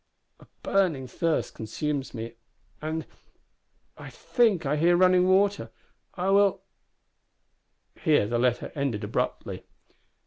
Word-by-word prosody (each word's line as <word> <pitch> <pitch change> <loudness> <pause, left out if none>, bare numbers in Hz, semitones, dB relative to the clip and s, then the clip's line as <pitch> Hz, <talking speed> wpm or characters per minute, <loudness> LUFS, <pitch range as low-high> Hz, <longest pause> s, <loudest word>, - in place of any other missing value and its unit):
A - - -18 0.2
burning 175 -9 +1
thirst 165 +5 -1
consumes 140 +5 -4
me 115 -1 -6 0.5
and 155 +1 -3 0.9
I - - -9
think 220 - +1
I 140 +2 +1
hear 170 +3 +3
water 185 - +6
running! 185 +2 +3 0.5
I 190 +1 0
will 200 0 +3 0.7
" - - -35
Here 155 - +4
the 120 +3 -1
letter 125 0 0
ended 135 -7 -2
abruptly. 105 - -3
155 Hz, 115 wpm, -26 LUFS, 130-185 Hz, 0.9 s, water